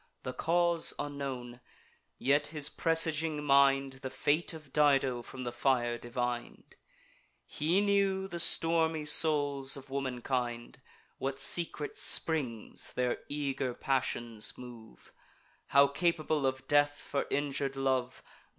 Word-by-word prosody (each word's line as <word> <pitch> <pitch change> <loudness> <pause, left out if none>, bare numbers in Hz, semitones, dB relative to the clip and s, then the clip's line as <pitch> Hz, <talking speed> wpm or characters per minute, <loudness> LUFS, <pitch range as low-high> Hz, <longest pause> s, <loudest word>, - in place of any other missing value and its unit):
The 130 - -5
cause 170 +3 +1
unknown; 135 -4 -6 0.6
yet 145 +2 +1
his 150 -1 -1
presaging 160 -2 +1
mind 135 -1 +3
The 135 - -5
fate 150 +5 0
of 155 -4 -12
Dido 135 -4 +2
from 130 +2 -9
the 120 - -4
fire 120 -1 0
divin'd; 120 0 -5 0.7
He 170 +6 0
knew 200 -1 +1
the 175 -2 -6
stormy 165 -2 +2
souls 145 -3 +3
of 135 0 -13
womankind, 125 -3 -3 0.4
What 135 0 -3
secret 155 -1 +1
springs 130 -9 +2
their 125 -1 -1
eager 135 -3 -3
passions 120 -4 -2
move, 115 - -13 0.5
How 140 +1 +5
capable 155 -1 0
of 130 0 -4
death 145 0 +2
for 140 - -3
injur'd 140 -1 -2
love. 130 -2 -2
140 Hz, 115 wpm, -31 LUFS, 130-155 Hz, 0.7 s, How